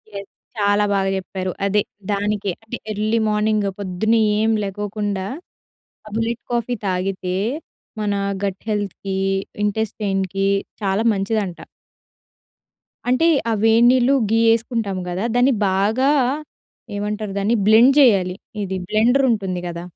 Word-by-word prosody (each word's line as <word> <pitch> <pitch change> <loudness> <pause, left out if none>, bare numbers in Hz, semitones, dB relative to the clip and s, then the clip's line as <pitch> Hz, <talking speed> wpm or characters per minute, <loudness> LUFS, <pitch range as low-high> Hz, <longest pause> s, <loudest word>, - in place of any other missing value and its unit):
Yes 200 0 -7 0.3
చాలా 205 0 +2
బాగా 195 -1 +1
చెప్పారు. 185 0 -4
అదే 205 +1 +2 0.3
దానికే. 205 -1 -1
అంటే 230 +2 -6
ఎర్లీ 215 +2 0
మార్నింగ్ 210 -1 +1
పొద్దున్న 200 +4 0 0.2
ఏం 220 +1 +2
లేగవకుండా 205 0 -3 0.8
ఆ - - -8
బుల్లెట్ 230 +1 -2
కాఫీ 240 +1 -1
తాగితే 185 0 -2 0.7
మన 205 -1 0 0.3
గట్ 190 -1 -4
హెల్త్‌కి 200 -2 -3 0.5
ఇంటెస్టైన్‍కి 195 -2 -1 0.4
చాలా 195 +3 +1
మంచిదంట. 195 -2 -2 1.5
అంటే 255 +7 +3 0.2
ఆ - - +1
వేడినీళ్లు 240 +4 +5 0.2
ఘీ 225 0 +3
ఏసుకుంటాము 225 -5 -2
కదా! 185 +5 -2
దాన్ని 250 +2 +4 0.2
బాగా 215 +9 +2 0.9
ఏమంటారు 210 0 -3
దాన్ని 215 +4 +1
బ్లెండ్ 230 +5 +6
చేయాలి. 195 -9 +4 0.3
ఇది 190 0 -3
బ్లెండర్ 245 +6 +3
ఉంటుంది 190 -5 -1
కదా! 170 0 -6
205 Hz, 115 wpm, -21 LUFS, 195-225 Hz, 1.5 s, బ్లెండ్